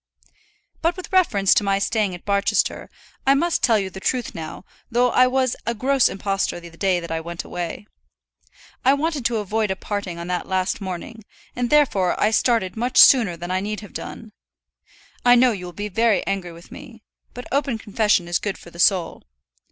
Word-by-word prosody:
But 335 +2 0
with 370 +2 -9
reference 210 - +4
to - - +2
my 195 -1 +1
staying 200 -2 0
at 175 - -14
Barchester, 200 0 0 0.4
I 275 - +6
must 340 +4 0
tell 230 -3 +4
you 195 -2 -3
the 190 - -8
truth 245 +4 -2
now, 165 +3 -8 0.2
though 245 +1 +2
I 255 0 +5
was 255 -1 0
a 235 - 0
gross 265 +3 +2
impostor 195 -2 -2
the 170 0 -12
day 185 0 +1
that 170 -1 -8
I 165 0 -2
went 170 +1 -6
away. 175 +3 -6 1.0
I 270 +2 +5
wanted 300 -3 -2
to 235 -1 +1
avoid 215 +1 -1
a 190 - -1
parting 195 -3 -5
on 170 - -6
that 180 0 -3
last 190 +2 -1
morning, 190 +4 -7 0.3
and 245 -1 -1
therefore 230 -12 +2
I 210 - +3
started 220 -5 +1
much 245 +3 -2
sooner 220 -10 +7
than 175 +1 -6
I 185 - +1
need 210 +2 -4
have 205 - -12
done. 225 -2 -8 0.9
I 245 0 +6
know 245 0 +5
you 190 -5 -5
will 175 - -7
be 205 +5 -5
very 225 +2 +1
angry 195 -3 -3
with 170 +1 -15
me; 240 -6 -12 0.3
but 245 - -7
open 275 -3 0
confession 210 -4 +1
is 175 - 0
good 205 -2 -4
for 170 - -14
the 170 - -14
soul. 180 -2 +2
210 Hz, 200 wpm, -22 LUFS, 185-245 Hz, 1.0 s, sooner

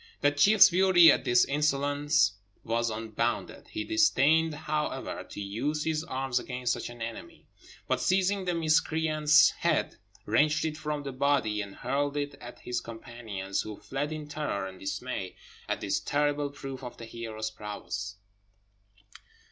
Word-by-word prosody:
That 145 0 +2
chief's 200 +6 +7
fury 180 -2 +7
at - - 0
this 120 0 +4
insolence 145 -4 +2 0.3
was 115 +1 0
unbounded; 115 +1 -3
he 320 - -4
disdained, 160 - +3
however, 150 0 -3
to - - -8
use 125 +10 -2
his 160 -1 -1
arms 130 -5 -1
against 125 -1 -2
such - - -5
an 120 -1 -7
enemy, 115 0 -8 0.4
but, - - 0
seizing 190 +1 +1
the 180 -1 0
miscreant's 155 -1 +4
head, - - 0 0.3
wrenched 150 +1 +2
it 155 -1 -2
from 150 -1 -4
the 140 - -4
body, 130 -6 +1
and 100 -1 -8
hurled 145 +1 -1
it 145 0 -2
at 120 - -10
his 125 - -3
companions, 115 -4 -5
who 105 -1 -7
fled 145 +3 -4
in 155 -1 -5
terror 150 -10 -3
and 95 -1 -9
dismay 95 0 -4 0.3
at - - -1
this 100 0 0
terrible 145 +5 0
proof 135 -2 -8
of 125 - -8
the 115 - -8
hero's 110 -1 -5
prowess. 105 -1 -6
140 Hz, 150 wpm, -29 LUFS, 115-155 Hz, 0.4 s, chief's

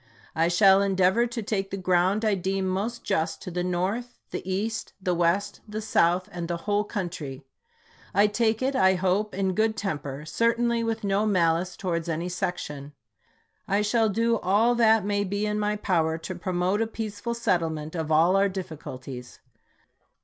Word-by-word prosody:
I 165 +1 +2
shall 195 +2 +5
endeavor 195 +4 +3
to 235 -1 -5
take 195 -2 -2
the 195 - -4
ground 185 +3 +2
I 215 - +3
deem 190 +1 -1
most 205 +6 -2
just 165 -5 -1
to 180 - -6
the 175 +1 -2
North, 190 +8 -2
the - - -3
East, 215 +4 -2
the 185 -2 0
West, 175 +3 0
the 215 +1 -4
South, 180 -4 +2
and 175 -1 -5
the 170 0 -2
whole 205 0 +2
country. 165 - -5 0.7
I 200 +2 +4
take 220 +2 +1
it, 270 +1 0
I 190 -4 +4
hope, 190 +3 0
in 190 -1 0
good 220 +3 +1
temper, 145 -6 -4
certainly 235 +5 +1
with 225 -1 -2
no 200 +2 +1
malice 175 -2 +1
towards 170 -3 -2
any 165 +2 -2
section. 150 -6 -4 0.7
I 205 +2 +2
shall 220 +1 +2
do 230 +2 +1
all 210 +6 +3
that 225 -3 +4
may 205 0 +1
be 205 +2 -2
in 210 0 -1
my 210 0 0
power 165 -6 0
to 165 +3 -6
promote 180 +3 -1
a 225 - +1
peace 215 -2 -5
ful 235 -1 -3
settlement 160 -8 -1
of 160 -2 -3
all 165 +4 +4
our 200 0 +3
difficulties. 135 -9 -8
195 Hz, 175 wpm, -26 LUFS, 175-215 Hz, 0.7 s, shall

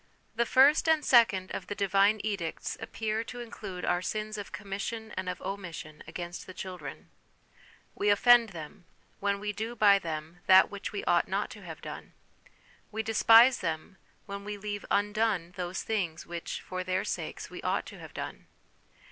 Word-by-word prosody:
The 235 0 +1
first 285 +6 +5
and 315 -2 +3
second 195 -7 +4
of - - -5
the 205 - -4
Divine 200 +1 +3
edicts 195 -7 -3
appear 220 0 -2
to 245 - -8
include 205 -6 -6
our 175 - +1
sins 215 +2 -3
of 205 -2 -6
commission 210 +3 -5
and 185 0 -3
of 180 - -4
omission 175 -6 -6
against 175 +1 -6
the 185 - -10
children: 180 -7 -8 0.8
we 205 - 0
offend 235 +2 +6
them, 175 +1 -9 0.3
when 200 0 0
we 210 +1 -2
do 225 +3 -4
by 205 -3 +6
them 160 0 -6
that 190 0 +7
which 200 0 -5
we 400 - -4
ought - - +3
not - - -1
to - - -10
have - - -9
done; - - -8 0.8
we 220 +1 -2
despise 225 +3 +6
them, 165 +3 -4 0.3
when 200 -1 -6
we 205 0 -5
leave 205 0 -5
undone 205 -4 +1
those 180 0 -3
things 180 -8 -2
which, 170 -1 -5
for 185 0 -4
their 185 +1 0
sakes, - - -4
we - - -7
ought - - 0
to - - -10
have - - -11
done. - - -6
200 Hz, 175 wpm, -30 LUFS, 180-220 Hz, 0.8 s, that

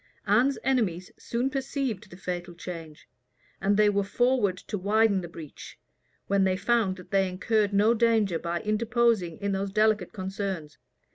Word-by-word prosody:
Anne's 270 +3 +3
enemies 205 -10 0
soon 240 +2 -1
perceived 265 -6 -3
the 175 - -12
fatal 175 -1 -5
change; 165 -3 -9 0.5
and 200 +1 +2
they 210 0 +5
were 200 -1 +2
forward 225 -2 +1
to 210 - -6
widen 205 +1 +2
the 175 - -6
breach, 160 -3 -11 0.5
when 200 0 +2
they 185 -1 +2
found 215 -2 +1
that 180 -1 -14
they 195 -1 +2
incurred 205 +3 +1
no 205 +3 +4
danger 220 -7 +2
by 170 0 -3
interposing 220 -4 +1
in 200 -1 -2
those 195 0 -2
delicate 215 -2 +2
concerns. 190 -5 -5
200 Hz, 155 wpm, -27 LUFS, 185-225 Hz, 0.5 s, they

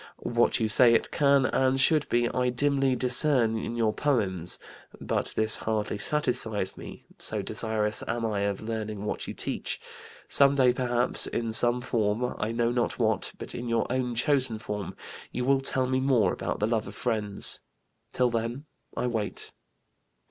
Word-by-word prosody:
What 120 0 +1
you 110 - +1
say 115 +2 +5
it - - 0
can 140 -2 +3
and 130 0 +1
should 150 +2 +3
be 120 0 +2
I 125 0 0
dimly 135 +1 +1
discern 125 -2 +3
in 115 - -5
your 110 -2 +1
Poems. 100 - +1 0.4
But - - -2
this 110 0 +2
hardly 105 -1 -2
satisfies 110 -7 -1
me - - -11
so - - -3
desirous 110 -1 -1
am 115 0 -2
I 105 -2 -1
of 100 -1 -1
learning 110 -2 -4
what - - -4
you - - -6
teach. - - -3 0.5
Some 140 0 +5
day, 130 -3 +4
perhaps, 125 -1 0
in 115 -1 -3
some 120 +2 +4
form, 115 0 -1
I 105 +1 -1
know 115 0 0
not 120 -1 -1
what, 110 -4 0
but - - -5
in 120 0 -5
your 115 -1 +1
own 125 -2 -1
chosen 130 -2 +2
form, 105 -3 -5 0.4
you 125 - -3
will 135 0 +3
tell 130 -1 +1
me 130 0 0
more 125 -8 +2
about - - -3
the 105 - +1
Love 110 -2 -1
of - - -9
Friends. 110 -5 0 0.5
Till 125 -1 +1
then 115 +5 -3 0.3
I - - -1
wait." 110 -4 -2
120 Hz, 170 wpm, -27 LUFS, 110-130 Hz, 0.5 s, say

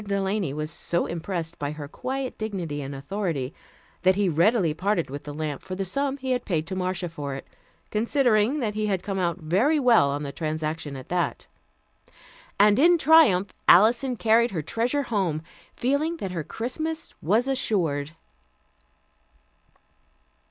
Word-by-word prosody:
Delany 200 -4 -1
was 155 +2 -4
so 170 +1 -1
impressed 170 0 -4
by 145 0 -3
her 150 -2 -7
quiet 260 - -4
dignity 180 -9 -3
and 140 0 -6
authority 150 -2 -3 0.5
that 185 +1 +4
he 200 -2 +2
readily 170 +1 +3
parted 180 -3 -1
with 145 +1 -7
the 145 - -6
lamp 150 -1 -4
for 185 - -6
the 195 +1 -2
sum 275 +8 -1
he 260 -1 -3
had 250 -1 0
paid 160 -5 -1
to 190 - -5
Marcia 185 -1 -2
for 145 -4 -5
it, 135 - -8 0.5
considering 235 +2 +2
that 215 -3 -1
he 215 0 -1
had 190 -3 -1
come 195 -2 -3
out 175 -1 0
very 195 - +2
well 235 - +5
on 145 +1 -2
the 140 - -4
transaction 155 -1 -3
at 130 -1 -9
that. 175 -1 -1 1.1
And 205 +3 +5
in 345 +4 +6
triumph 270 - +5
Alison 235 +7 +5
carried 230 +1 +3
her 165 -7 -3
treasure 245 - -1
home, 185 - -1 0.3
feeling 285 +6 0
that 195 - -4
her 170 -3 -3
Christmas 315 - -4
was 215 - +2
assured. 165 - 0
190 Hz, 160 wpm, -25 LUFS, 155-235 Hz, 1.1 s, in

